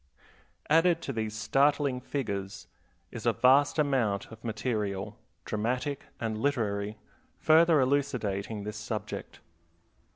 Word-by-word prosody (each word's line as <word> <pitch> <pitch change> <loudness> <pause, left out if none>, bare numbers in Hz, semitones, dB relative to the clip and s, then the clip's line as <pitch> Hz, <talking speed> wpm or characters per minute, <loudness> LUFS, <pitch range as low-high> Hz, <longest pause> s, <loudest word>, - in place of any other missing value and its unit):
Added 165 +2 +4
to 135 - -3
these 110 -2 -3
startling 140 +4 +2
figures 100 -8 -4 0.5
is - - -5
a - - +4
vast 140 +4 +4
amount 130 -11 +1
of 110 0 -12
material, 105 -2 -3 0.3
dramatic 125 +6 -2
and 110 -2 -2
literary, 110 -6 -1 0.4
further 160 0 +5
elucidating 120 -7 -1
this 105 +1 -5
subject. 110 0 -6
115 Hz, 105 wpm, -29 LUFS, 105-140 Hz, 0.5 s, further